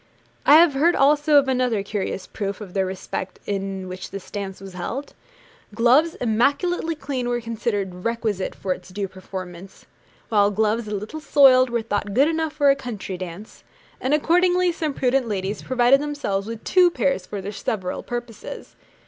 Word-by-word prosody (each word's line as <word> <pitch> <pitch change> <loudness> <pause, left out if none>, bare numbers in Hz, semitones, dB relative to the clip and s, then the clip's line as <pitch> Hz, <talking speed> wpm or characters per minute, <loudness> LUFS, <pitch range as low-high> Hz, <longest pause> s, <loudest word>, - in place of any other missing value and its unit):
I 290 - +9
have 325 -2 +7
heard 325 +6 +3
also 295 +2 +4
of 280 -1 +4
another 250 -5 +1
curious 195 -2 -3
proof 200 -2 -4
of 200 -4 -9
the 195 -1 +1
respect 185 0 -5
in 195 -1 -3
which 185 +1 -7
this 195 -2 -9
dance 195 -2 -5
was 195 -1 -10
held. 240 +11 -5 0.6
Gloves 260 +9 +4
immaculately 285 +9 +1
clean 260 -5 -3
were 240 0 0
considered 210 -6 -3
requisite 225 -5 -2
for 185 -1 -2
its 180 - -13
due 195 +1 -3
performance, 185 -1 -9 0.4
while 205 -2 +4
gloves 215 +2 0
a 210 - -3
little 210 +10 -6
soiled 260 -4 +6
were 235 -1 -1
thought 205 -1 -2
good 275 +4 +5
enough 320 -1 -1
for 290 -2 +4
a - - +2
country 230 -8 -6
dance; 185 +3 -9 0.4
and 270 +3 +2
accordingly 355 +3 +3
some 310 -4 -3
prudent 260 -1 +1
ladies 200 -1 -3
provided 255 +2 +3
themselves 285 -10 -2
with 225 -1 -7
two 365 -1 +5
pairs 190 - -1
for 205 - -5
their 195 +2 -5
several 195 -2 -3
purposes. 240 -2 -7
230 Hz, 170 wpm, -23 LUFS, 195-275 Hz, 0.6 s, I